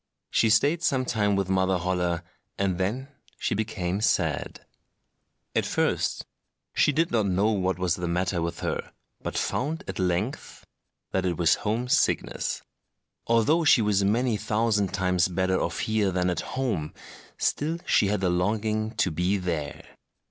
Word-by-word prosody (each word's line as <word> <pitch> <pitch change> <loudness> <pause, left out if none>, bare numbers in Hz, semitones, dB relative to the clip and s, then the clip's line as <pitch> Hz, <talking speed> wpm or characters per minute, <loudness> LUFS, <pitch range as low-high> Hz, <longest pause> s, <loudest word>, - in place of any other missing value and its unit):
She 110 - +3
stayed 145 +10 +3
some 135 -7 +1
time 105 -4 +1
with 100 -1 0
Mother 95 0 +2
Holle, 90 -1 -1 0.4
and 95 -2 0
then 120 +9 -2 0.3
she - - -1
became 100 -3 -2
sad. 110 - 0 0.9
At - - +3
first - - 0 0.5
she - - +3
did 165 +4 +1
not 110 -4 +2
know 100 +4 +2
what 95 -3 0
was 90 -1 0
the 90 -1 -3
matter 90 +1 0
with 85 0 -3
her, - - -3 0.3
but - - -4
found 155 +5 -1
at 95 - -5
length 95 +7 -2 0.5
that 95 - 0
it 90 -3 -1
was 85 0 +4
home 115 +4 -1
sickness: - - 0 0.6
although 115 +9 +3
she 130 -7 +5
was 100 -2 +2
many 115 +3 +2
thousand 105 -3 +1
times 90 -2 +2
better 95 +1 0
off 85 - -2
here 110 -2 +1
than 90 0 +1
at 90 - -2 0.2
home, 105 -13 -2 0.4
still 160 +3 0
she 100 - +3
had 100 -1 -1
a 90 - +3
longing 110 +4 0
to 105 -4 +1
be 90 +5 +1
there. 85 -6 -4
100 Hz, 155 wpm, -26 LUFS, 90-110 Hz, 0.9 s, she